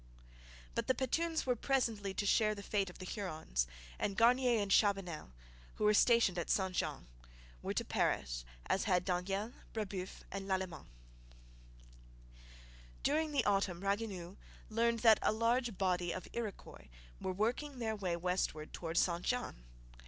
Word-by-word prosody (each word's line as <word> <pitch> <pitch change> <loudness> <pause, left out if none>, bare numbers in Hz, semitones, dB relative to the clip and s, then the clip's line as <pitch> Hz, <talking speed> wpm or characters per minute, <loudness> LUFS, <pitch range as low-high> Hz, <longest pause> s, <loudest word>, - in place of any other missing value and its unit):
But - - -2
the 260 - +3
Petuns 320 +6 0
were 250 -1 +2
presently 230 -6 0
to 205 - -1
share 215 +1 +3
the 200 - -8
fate 200 -2 0
of 180 - -12
the 185 - -7
Hurons; 155 - -2 0.3
and 200 -1 -1
Garnier 245 0 +5
and 200 -1 -1
Chabanel, 195 - +2 0.5
who - - -3
were 210 0 +5
stationed 220 -5 +5
at 170 - -3
St 190 -2 +1
Jean, - - -2 0.6
were - - -3
to - - 0
perish - - 0 0.2
as 195 - +1
had 180 -4 +2
Daniel, 195 +5 -1 0.2
Brebeuf, 195 -4 -4
and 195 0 -5
Lalemant. 185 -5 -2 2.2
During 310 +2 +2
the 275 -5 +1
autumn 195 -3 +1
Ragueneau 195 -3 -2 0.3
learned 230 +1 +2
that 225 -2 +7
a - - +3
large 230 0 +1
body 180 -2 +1
of 185 - -5
Iroquois 225 -4 -6 0.3
were - - -2
working 245 +9 -1
their 220 -2 -1
way 185 -4 -1
westward 170 -3 -1
towards 165 0 -1
St 170 -1 0
Jean. 245 - -2
200 Hz, 150 wpm, -35 LUFS, 180-230 Hz, 2.2 s, that